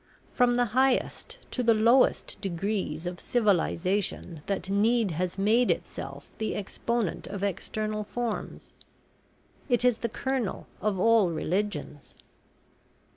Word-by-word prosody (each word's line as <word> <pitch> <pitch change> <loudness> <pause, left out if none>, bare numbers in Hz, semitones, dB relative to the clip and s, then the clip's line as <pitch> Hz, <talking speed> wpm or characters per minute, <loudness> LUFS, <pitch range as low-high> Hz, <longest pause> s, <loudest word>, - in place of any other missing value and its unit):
From 245 -1 +3
the 245 0 +3
highest 265 - +1
to 255 - -1
the 230 -2 +4
lowest 235 +4 +3
degrees 185 -3 -2
of 175 0 -4
civilisation 190 -5 0
that 195 -2 -2
need 215 +1 +2
has 180 +3 -2
made 220 +5 +3
itself - - -4
the 220 - -1
exponent 220 0 -2
of 200 -1 -5
external 215 +2 -2
forms. 230 +1 -4 1.0
It 245 0 +3
is 245 -2 +3
the 235 - -2
kernel 260 -2 -2 0.2
of 205 -3 0
all 225 -2 +5
religions." 165 -3 -3
210 Hz, 120 wpm, -28 LUFS, 190-235 Hz, 1.0 s, all